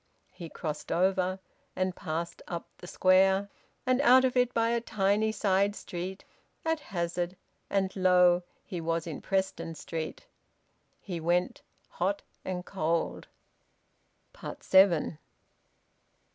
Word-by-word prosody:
He 175 -3 -9
crossed 155 -1 -5
over, 185 +1 +2 0.4
and 185 0 -1
passed 165 +2 -4
up 170 -1 -5
the 180 - -10
Square, 190 +2 +4 0.4
and 255 +1 +3
out 260 0 +7
of 255 - 0
it 250 -1 +3
by 230 -1 +2
a 235 0 +1
tiny 210 0 +1
side 200 -1 +1
street, 185 +1 -6 0.4
at 320 -1 +1
hazard, 175 - -3 0.3
and 195 -1 0
lo! 180 -2 +5 0.2
he 175 -3 -5
was 165 0 -1
in 160 -4 -6
Preston 190 -4 -1
Street. 160 - -5 0.7
He 180 -4 -5
went 175 +2 0 0.3
hot 195 +3 -2 0.2
and 180 -1 -4
cold. 165 -3 -1 1.3
SEVEN. 180 -5 +4
185 Hz, 115 wpm, -29 LUFS, 170-200 Hz, 1.3 s, out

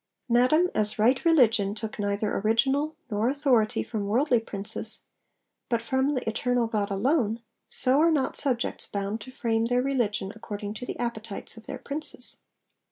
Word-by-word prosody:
'Madam, 255 +9 +4
as 210 0 0
right 245 +5 +3
religion 225 - +4
took 220 0 -6
neither 205 +1 -1
original 270 +9 +1 0.2
nor 215 +3 +1
authority 265 -6 +2
from 210 -3 -4
worldly 245 +3 +3
princes, 205 -2 0 0.7
but 235 -2 +2
from 265 +5 0
the 255 - -3
Eternal 245 +2 +1
God 215 -2 -1
alone, 225 +2 +1 0.3
so 260 +2 +2
are 330 +2 +5
not 295 -5 +1
subjects 255 -4 0
bound 200 +2 -3
to 255 - -9
frame 230 -3 0
their 245 +1 +1
religion 220 -7 -1
according 205 -1 -6
to 245 +3 -7
the - - -5
appetites 230 -4 -5
of 225 -1 -14
their - - -5
Princes.' 285 -3 -1
230 Hz, 160 wpm, -27 LUFS, 215-265 Hz, 0.7 s, are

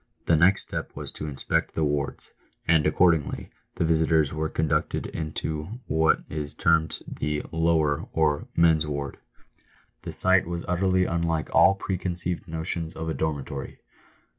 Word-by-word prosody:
The 85 - +4
next 95 +5 +4
step - - -6
was - - -6
to 75 - -6
inspect 70 -3 -1
the 80 - +1
wards; 75 -1 -2 0.3
and, 80 -2 +4
accordingly, 80 -1 +2 0.2
the - - 0
visitors 80 -2 +2
were 80 0 -1
conducted 80 -1 0
into 80 +5 -4
what 80 0 +2
is 75 -1 -5
termed 80 0 +2
the 75 0 -2
" - - -22
lower," 80 -3 +1
or 75 -2 +1
men's 80 -2 +4
ward. 70 -2 -4 0.8
The - - -6
sight 95 -2 +4
was 85 -1 -4
utterly 95 +1 +2
unlike 85 -2 -1
all 95 - +6
preconceived 90 -2 -3
notions 80 0 -4
of 80 0 -4
a - - -1
dormitory. 70 -3 -4
80 Hz, 145 wpm, -26 LUFS, 75-85 Hz, 0.8 s, all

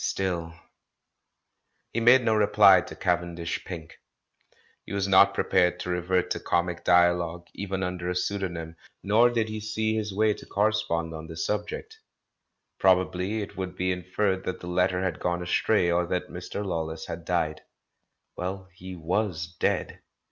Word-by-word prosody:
Still 85 -4 -2 1.4
He 115 - 0
made 120 +2 +6
no 110 - +3
reply 105 -2 +6
to - - -9
Cavendish 85 -1 -2
Pink. 80 -3 -8 0.8
He - - -9
was 100 -1 0
not 100 +1 +6
ppepared 90 -1 +2
to 90 0 -4
revert 90 +1 0
to - - 0
comic 85 0 -1
dialogue, 85 -1 +3
even 95 -1 -3
under 90 -1 -3
a - - 0
pseudonj^m, 90 -3 -3 0.3
nor 110 +4 +5
did 115 -2 0
he 110 0 -4
see 110 +1 -1
his 105 -1 -2
way 105 +2 +2
to - - -12
correspond 100 -6 0
on 80 0 -7
the 80 0 -9
subject. 105 - -3 0.8
Probably 95 +3 +2
it - - -10
would 95 -1 -5
be 90 0 0
inferred 95 +1 -1
that 95 - -3
the - - -9
letter 90 +1 +1
had 90 -4 -2
gone 90 0 -1
astray, 90 0 +2
or 85 0 +1
that 90 0 -2
Mr. 90 +3 -5
Lawless 80 -3 -3
had 85 0 -6
died. 80 -3 -1 0.7
Well, 95 +1 -5
he 95 +1 -9
was 85 0 -2
dead. - - 0
90 Hz, 155 wpm, -27 LUFS, 85-100 Hz, 1.4 s, made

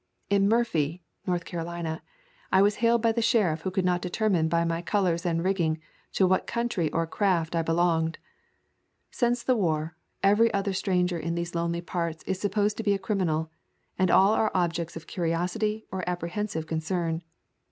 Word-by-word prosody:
In 200 0 +4
Murphy 175 -8 +1 0.2
[North 175 -2 0
Carolina] 170 -1 -4 0.5
I 190 +1 +6
was 205 +1 +2
hailed 230 0 +3
by 230 - +4
the 230 +1 0
sheriff 205 -9 +2
who 190 - -2
could 185 0 -1
not 180 -1 +1
determine 180 -3 +1
by 170 0 +2
my 165 0 -1
colors 175 -3 0
and 165 -1 0
rigging 175 -4 +1 0.4
to 190 - +3
what 185 0 +2
country 235 -9 -1
or 165 0 0
craft 170 -1 0
I 165 - +2
belonged. 165 0 +1 0.9
Since 240 0 0
the 255 - +2
war, 160 -5 0 0.3
every 210 +4 +5
other 195 0 0
stranger 180 -2 0
in 170 +1 -2
these 170 0 -3
lonely 170 0 -1
parts 170 -2 -3
is 190 - -2
supposed 205 +1 0
to 225 - -3
be 205 -1 +3
a - - -1
crimi 195 -2 0
nal, 160 0 -1 0.4
and 185 -1 +2
all 195 +4 +5
are 220 -1 +2
objects 170 -2 -1
of 165 - -8
curiosity 180 +6 -1
or 185 -1 -3
appre 175 -1 -2
hensive 200 -5 -3
concern. 165 +1 -2
180 Hz, 180 wpm, -27 LUFS, 165-200 Hz, 0.9 s, I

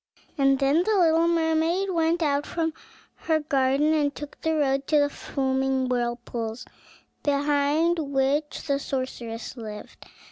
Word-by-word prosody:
And 275 -1 +3
then 280 +4 +3
the 425 +3 +1
little 330 -2 +4
mermaid 335 +3 +1
went 330 0 +1
out 290 -1 0
from 325 -2 -2 0.4
her 320 -1 0
garden, 280 0 +2
and 290 -2 +1
took 295 0 -9
the 320 0 0
road 275 -2 0
to 305 - +3
the 290 0 +3
foaming 265 -2 -1
whirlpools, 240 -2 -3 0.6
behind 290 +3 +1
which 280 +1 -1
the 280 -2 0
sorceress 255 -4 -5
lived. 215 -3 -9
285 Hz, 135 wpm, -25 LUFS, 265-320 Hz, 0.6 s, little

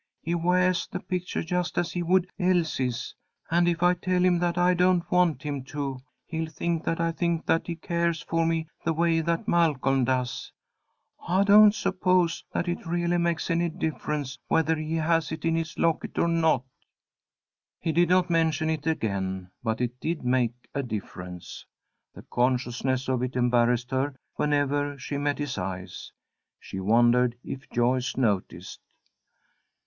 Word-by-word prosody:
"He 170 - -1
weahs 180 +1 +2
the - - -4
pictuah 180 -2 -3
just 180 +1 -2
as 170 -2 0
he 175 - -2
would 180 +1 +3
Elsie's, 160 - 0 0.4
and 175 +1 +3
if 170 0 0
I 180 0 +5
tell 180 0 0
him 175 -1 +3
that 175 0 0
I 180 +1 +4
don't 180 0 +3
want 175 -7 +2
him 145 -3 -3
to, 135 -2 -4 0.3
he'll 160 0 -3
think 165 +1 -2
that 165 - -1
I 165 0 +1
think 170 0 -1
that 165 - +1
he 170 - -3
cares 170 0 -1
for 165 0 0
me 165 -1 0 0.2
the 165 - +1
way 165 0 +2
that 165 +1 -1
Malcolm 135 -6 +2
does. 125 -1 -2 0.8
I 185 +3 +3
don't 210 +1 +7
suppose 180 -5 +1
that 175 - -2
it 175 - -2
really 175 +1 0
makes 170 0 0
any 170 +1 +1
difference 150 -4 -3
whethah 160 0 +2
he 155 +1 -3
has 165 0 +1
it 160 0 -5
in 165 - +2
his 165 0 -3
locket 165 -2 0
or - - +3
not." 160 -6 +2 1.2
He 165 - -1
did 170 +1 +3
not 180 0 +4
mention 160 -2 +1
it 155 -1 -3
again, 95 - -2
but 110 0 -1
it 125 0 -2
did 160 0 -3
make 125 -1 0
a 140 - -1
difference. 90 -7 -7 0.5
The - - -11
consciousness 125 +1 0
of 130 -2 0
it 125 0 -3
embarrassed 120 0 +2
her 135 +1 -1 0.2
whenever 145 -1 0
she 140 +2 -4
met 145 0 0
his 145 -7 -3
eyes. 90 0 -6 0.5
She 95 - -7
wondered 120 +4 +3
if 135 +1 -7
Joyce 125 +1 0
noticed. 105 -7 -1
160 Hz, 165 wpm, -26 LUFS, 130-170 Hz, 1.2 s, don't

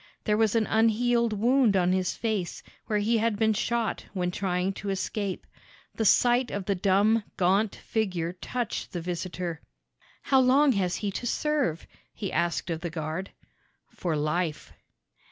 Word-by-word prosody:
There 210 - +2
was 220 0 +2
an 225 -1 +3
unhealed 230 +2 +2
wound 230 0 +3
on 180 0 +2
his 185 -1 0
face, 210 -7 -3 0.2
where 215 -3 +1
he 220 +2 +2
had 225 -1 +1
been 220 0 +3
shot 235 +1 -1
when 180 -1 0
trying 185 0 -1
to 200 +1 -6
escape. 195 0 -3 0.5
The 220 - -2
sight 245 +4 +4
of 200 -2 -4
the 200 - +1
dumb, 200 +4 +3
gaunt 195 +4 +2
figure 180 -6 -2
touched 240 +5 -4
the 175 - -3
visitor. 175 -1 -4 0.6
"How 265 - +4
long 265 +3 +5
has 190 -6 0
he 205 -2 -2
to 240 - -4
serve?" 290 - 0 0.3
he 200 - -4
asked 170 +1 0
of 160 0 -3
the 170 - -3
guard. 160 +3 -4 0.6
"For 170 -3 -2
life." 155 +1 -2
200 Hz, 155 wpm, -27 LUFS, 180-225 Hz, 0.6 s, long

